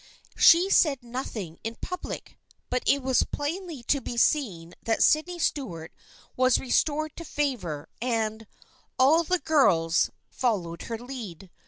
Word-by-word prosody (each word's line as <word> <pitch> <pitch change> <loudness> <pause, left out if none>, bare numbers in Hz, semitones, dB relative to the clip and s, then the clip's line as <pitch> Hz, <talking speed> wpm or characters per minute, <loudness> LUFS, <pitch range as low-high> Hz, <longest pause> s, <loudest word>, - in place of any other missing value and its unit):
She 355 +4 +6
said 275 -9 +3
nothing 230 -9 -6
in 225 +1 -4
public, 360 0 -7 0.3
but 250 - +1
it 280 -1 +3
was 260 -1 +3
plainly 320 -2 -4
to 280 +3 +1
be 240 - -6
seen 195 - +1
that 225 - +1
Sydney 345 +3 +2
Stuart 180 - -3 0.4
was 255 -1 +4
restored 300 +4 0
to 335 - -6
favor, 240 - -3
and 225 -2 -2 0.3
" - - -35
all 305 +6 +5
the 365 +3 +1
girls 200 - +3
" - - -49
followed 185 -9 -1
her 230 - -3
lead. 220 -8 -9
255 Hz, 145 wpm, -26 LUFS, 210-295 Hz, 0.4 s, She